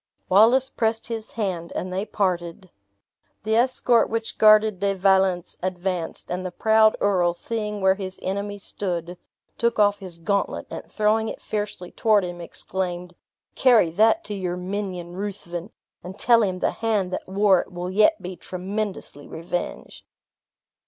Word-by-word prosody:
Wallace 235 Hz, +7 st, +5 dB
pressed 225 Hz, 0 st, -1 dB
his 225 Hz, -2 st, -5 dB
hand, 185 Hz, -6 st, -3 dB
and 185 Hz, 0 st, -3 dB
they 195 Hz, +3 st, -2 dB
parted. 180 Hz, -2 st, -2 dB, 0.7 s
The 220 Hz, +1 st, +1 dB
escort 240 Hz, -1 st, +3 dB
which 225 Hz, 0 st, -4 dB
guarded 215 Hz, -2 st, +6 dB
De 200 Hz, 0 st, 0 dB
Valence 190 Hz, -2 st, +2 dB
advanced; 180 Hz, -2 st, -3 dB
and 180 Hz, +1 st, -2 dB
the 185 Hz, -, -3 dB
proud 220 Hz, +3 st, +4 dB
earl, 180 Hz, -4 st, +2 dB
seeing 210 Hz, 0 st, -4 dB
where 190 Hz, 0 st, +5 dB
his 190 Hz, -1 st, -7 dB
enemy 200 Hz, +2 st, -3 dB
stood, 180 Hz, -3 st, -4 dB, 0.4 s
took 235 Hz, 0 st, +1 dB
off 205 Hz, -1 st, +3 dB
his 185 Hz, -4 st, -7 dB
gauntlet, 200 Hz, +4 st, -1 dB
and -, -, -8 dB
throwing 220 Hz, +1 st, +1 dB
it -, -, -7 dB
fiercely 205 Hz, -4 st, -4 dB
toward 215 Hz, -3 st, +3 dB
him, 175 Hz, -1 st, -6 dB
exclaimed, 180 Hz, 0 st, -4 dB, 0.4 s
"Carry 230 Hz, -10 st, +4 dB
that 220 Hz, -, +3 dB
to 210 Hz, -, -5 dB
your 180 Hz, -3 st, -3 dB
minion 180 Hz, -2 st, -5 dB
Ruthven, 190 Hz, -2 st, -5 dB, 0.3 s
and 185 Hz, +3 st, -9 dB
tell 235 Hz, 0 st, +5 dB
him 190 Hz, -4 st, 0 dB
the -, -, 0 dB
hand 210 Hz, -5 st, -1 dB
that -, -, -4 dB
wore 195 Hz, -1 st, +4 dB
it -, -, -13 dB
will 180 Hz, +1 st, -5 dB
yet 215 Hz, +12 st, +4 dB
be 180 Hz, +1 st, -6 dB
tremendously 185 Hz, -5 st, -5 dB
revenged!" 170 Hz, +2 st, -5 dB
195 Hz, 150 wpm, -24 LUFS, 180-215 Hz, 0.7 s, guarded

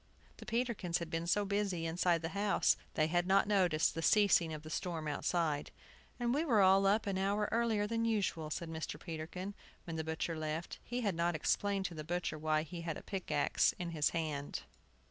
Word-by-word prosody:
The -, -, -11 dB
Peterkins 230 Hz, -7 st, 0 dB
had 170 Hz, -2 st, -6 dB
been 165 Hz, +1 st, -2 dB
so 205 Hz, +4 st, +2 dB
busy 200 Hz, -4 st, -1 dB
inside 170 Hz, 0 st, +1 dB
the 165 Hz, -, -1 dB
house 200 Hz, +2 st, +2 dB, 0.2 s
they 155 Hz, -, +3 dB
had 175 Hz, +2 st, +1 dB
not 195 Hz, +1 st, +4 dB
noticed 180 Hz, -6 st, +3 dB
the 165 Hz, -, -3 dB
ceasing 195 Hz, -3 st, +4 dB
of 155 Hz, -1 st, -6 dB
the 155 Hz, -, -8 dB
storm 165 Hz, -3 st, -3 dB
outside. 150 Hz, 0 st, 0 dB, 0.5 s
"And 240 Hz, 0 st, +1 dB
we 295 Hz, +4 st, +1 dB
were 240 Hz, -10 st, +3 dB
all 195 Hz, 0 st, +6 dB
up 210 Hz, +3 st, +3 dB
an 195 Hz, -2 st, -1 dB
hour 200 Hz, +2 st, +1 dB
earlier 225 Hz, -3 st, +2 dB
than 230 Hz, +2 st, -1 dB
usual," 200 Hz, -8 st, 0 dB
said 170 Hz, +2 st, -3 dB
Mr. 160 Hz, -1 st, -5 dB
Peterkin, 175 Hz, +4 st, -6 dB, 0.3 s
when 165 Hz, -2 st, -5 dB
the 160 Hz, -, -1 dB
butcher 160 Hz, +1 st, -2 dB
left. 155 Hz, +1 st, -4 dB
He 245 Hz, +1 st, -3 dB
had 205 Hz, -5 st, +1 dB
not 170 Hz, 0 st, 0 dB
explained 195 Hz, +5 st, 0 dB
to 180 Hz, -, -3 dB
the 155 Hz, -2 st, -6 dB
butcher 170 Hz, -1 st, -2 dB
why 155 Hz, 0 st, +1 dB
he 170 Hz, +2 st, -7 dB
had 165 Hz, -2 st, -3 dB
a -, -, -10 dB
pickaxe 160 Hz, -7 st, +1 dB
in 175 Hz, -1 st, -4 dB
his 155 Hz, -3 st, +2 dB
hand. 150 Hz, -3 st, -3 dB
175 Hz, 205 wpm, -34 LUFS, 160-200 Hz, 0.5 s, all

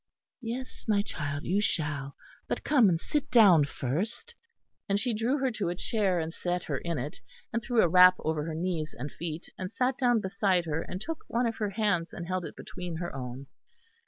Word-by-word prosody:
"Yes, 245 Hz, +2 st, -5 dB
my 205 Hz, -2 st, +3 dB
child, 145 Hz, -7 st, -4 dB
you 195 Hz, +4 st, +1 dB
shall; 145 Hz, -7 st, -1 dB, 0.3 s
but -, -, -2 dB
come 255 Hz, -9 st, +5 dB
and 165 Hz, -2 st, +1 dB
sit 295 Hz, -, -2 dB
down 190 Hz, -, +7 dB
first," 180 Hz, -, -3 dB, 0.6 s
and 200 Hz, +1 st, +2 dB
she 245 Hz, +1 st, 0 dB
drew 230 Hz, +6 st, +1 dB
her 265 Hz, -2 st, +1 dB
to 210 Hz, -6 st, -2 dB
a 175 Hz, -, -2 dB
chair 195 Hz, -2 st, +1 dB
and 160 Hz, 0 st, -3 dB
set 180 Hz, 0 st, -2 dB
her -, -, -2 dB
in 170 Hz, -2 st, -3 dB
it, 140 Hz, +4 st, -5 dB, 0.3 s
and 235 Hz, -, 0 dB
threw 235 Hz, -1 st, +3 dB
a -, -, +5 dB
wrap 180 Hz, +2 st, +8 dB
over 155 Hz, -1 st, -2 dB
her 160 Hz, -1 st, -4 dB
knees 165 Hz, -2 st, -2 dB
and 140 Hz, +3 st, -5 dB
feet; 165 Hz, 0 st, -5 dB
and 185 Hz, -1 st, -4 dB
sat 255 Hz, +1 st, 0 dB
down 245 Hz, -3 st, +4 dB
beside 190 Hz, -2 st, +1 dB
her, 160 Hz, 0 st, -1 dB
and 185 Hz, -, -6 dB
took 325 Hz, +6 st, -5 dB
one 240 Hz, +2 st, +1 dB
of 230 Hz, -1 st, -1 dB
her 210 Hz, -2 st, -1 dB
hands, 200 Hz, -5 st, 0 dB
and 175 Hz, -, -5 dB
held 185 Hz, -1 st, -2 dB
it -, -, -8 dB
between 180 Hz, -2 st, -6 dB
her 175 Hz, -2 st, -4 dB
own. 130 Hz, +1 st, -6 dB
185 Hz, 210 wpm, -29 LUFS, 160-225 Hz, 0.6 s, wrap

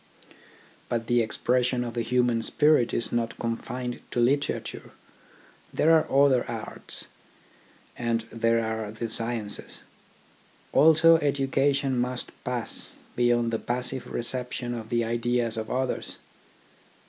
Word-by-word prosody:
But 115 Hz, -1 st, -1 dB
the 120 Hz, +1 st, +3 dB
expression 125 Hz, +2 st, +1 dB
of 120 Hz, -1 st, -5 dB
the 120 Hz, -, -1 dB
human 120 Hz, 0 st, +1 dB
spirit 145 Hz, 0 st, +3 dB
is 115 Hz, -, -1 dB
not 115 Hz, -1 st, -1 dB
confined 120 Hz, +1 st, -4 dB
to -, -, -2 dB
literature. 140 Hz, +4 st, -1 dB, 0.8 s
There 160 Hz, -, +3 dB
are 160 Hz, -, +4 dB
the -, -, -14 dB
other 135 Hz, -3 st, +4 dB
arts, 115 Hz, -2 st, -4 dB, 0.9 s
and 115 Hz, -1 st, 0 dB
there 115 Hz, 0 st, +1 dB
are 110 Hz, -1 st, -3 dB
the 115 Hz, +2 st, -4 dB
sciences. 115 Hz, -2 st, -2 dB, 0.9 s
Also 160 Hz, +1 st, +7 dB
education 140 Hz, -2 st, +1 dB
must 125 Hz, 0 st, -2 dB
pass 125 Hz, -3 st, -3 dB, 0.2 s
beyond 120 Hz, -1 st, +2 dB
the 115 Hz, -, 0 dB
passive 125 Hz, +2 st, -3 dB
reception 125 Hz, 0 st, -2 dB
of 110 Hz, -2 st, -6 dB
the 120 Hz, -1 st, +1 dB
ideas 120 Hz, 0 st, 0 dB
of 110 Hz, -1 st, -4 dB
others. 130 Hz, 0 st, -2 dB
120 Hz, 125 wpm, -27 LUFS, 115-130 Hz, 0.9 s, Also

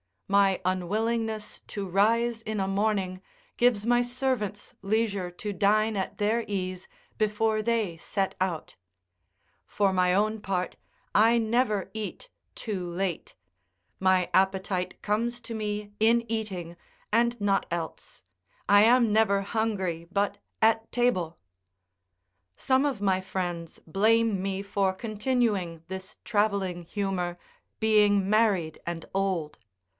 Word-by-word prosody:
My 195 Hz, -1 st, +3 dB
unwillingness 215 Hz, +4 st, -1 dB
to 200 Hz, -1 st, -4 dB
rise 225 Hz, +5 st, +2 dB
in 215 Hz, -2 st, -2 dB
a 190 Hz, -, 0 dB
morning 195 Hz, -2 st, 0 dB, 0.4 s
gives 240 Hz, -4 st, +3 dB
my 240 Hz, +1 st, +4 dB
servants 245 Hz, -4 st, -2 dB
leisure 200 Hz, -2 st, 0 dB
to 190 Hz, +4 st, -5 dB
dine 215 Hz, +2 st, +2 dB
at 190 Hz, -, -3 dB
their 220 Hz, +3 st, +1 dB
ease 185 Hz, -2 st, -3 dB, 0.3 s
before 215 Hz, 0 st, +1 dB
they 215 Hz, -6 st, 0 dB
set 195 Hz, +3 st, -2 dB
out; 185 Hz, -4 st, -2 dB, 0.9 s
for 200 Hz, -2 st, +1 dB
my 180 Hz, -1 st, +3 dB
own 215 Hz, +3 st, +1 dB
part, 185 Hz, -3 st, -2 dB, 0.4 s
I 230 Hz, +2 st, +5 dB
never 225 Hz, -3 st, +1 dB
eat 220 Hz, -, -6 dB, 0.3 s
too 190 Hz, -6 st, -4 dB
late; 175 Hz, -1 st, -3 dB, 0.6 s
my 185 Hz, -1 st, +3 dB
appetite 190 Hz, -1 st, +1 dB
comes 235 Hz, +3 st, -1 dB
to 230 Hz, -, -7 dB
me 210 Hz, -1 st, -3 dB
in 230 Hz, +2 st, +4 dB
eating, 185 Hz, -7 st, -4 dB, 0.3 s
and 235 Hz, +2 st, +2 dB
not 200 Hz, -1 st, +2 dB
else; 165 Hz, -, -6 dB, 0.5 s
I 205 Hz, +1 st, +7 dB
am 235 Hz, 0 st, +5 dB
never 205 Hz, -2 st, +3 dB
hungry 195 Hz, -6 st, -2 dB
but 200 Hz, +1 st, 0 dB, 0.2 s
at 225 Hz, 0 st, +3 dB
table. 185 Hz, -10 st, +1 dB, 1.2 s
Some 260 Hz, +1 st, +2 dB
of 270 Hz, -8 st, -1 dB
my 190 Hz, -2 st, +2 dB
friends 175 Hz, -3 st, -4 dB
blame 215 Hz, +3 st, +2 dB
me 195 Hz, 0 st, -2 dB
for 200 Hz, -1 st, 0 dB
continuing 210 Hz, -5 st, -1 dB
this 190 Hz, 0 st, -7 dB
travelling 200 Hz, -5 st, 0 dB
humour, 180 Hz, -2 st, -2 dB, 0.4 s
being 205 Hz, -3 st, +4 dB
married 200 Hz, -7 st, +2 dB
and 170 Hz, -1 st, -4 dB
old. 185 Hz, -6 st, -1 dB
205 Hz, 120 wpm, -27 LUFS, 185-220 Hz, 1.2 s, I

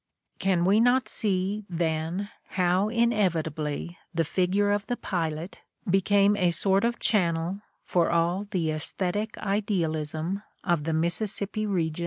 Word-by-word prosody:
Can 180 Hz, -3 st, +2 dB
we 200 Hz, +3 st, +4 dB
not 245 Hz, +2 st, +3 dB
see, 200 Hz, -1 st, 0 dB
then, 170 Hz, +3 st, -2 dB, 0.3 s
how 185 Hz, +3 st, +2 dB
inevitably 170 Hz, -9 st, 0 dB, 0.2 s
the 165 Hz, -, +2 dB
figure 190 Hz, +5 st, +1 dB
of 205 Hz, 0 st, -1 dB
the 245 Hz, -, -2 dB
pilot 165 Hz, -1 st, -3 dB, 0.3 s
became 200 Hz, +2 st, +4 dB
a 180 Hz, -4 st, +2 dB
sort 195 Hz, +3 st, +2 dB
of 235 Hz, 0 st, +1 dB
channel 175 Hz, -1 st, 0 dB, 0.2 s
for 175 Hz, -2 st, +1 dB
all 170 Hz, +4 st, +1 dB
the 175 Hz, -6 st, 0 dB
assthetic 185 Hz, +7 st, -2 dB
idealism 180 Hz, -4 st, -1 dB, 0.2 s
of 170 Hz, -5 st, 0 dB
the 160 Hz, -, 0 dB
Mississippi 200 Hz, +5 st, 0 dB
region? 165 Hz, -5 st, -1 dB
185 Hz, 130 wpm, -27 LUFS, 165-205 Hz, 0.3 s, we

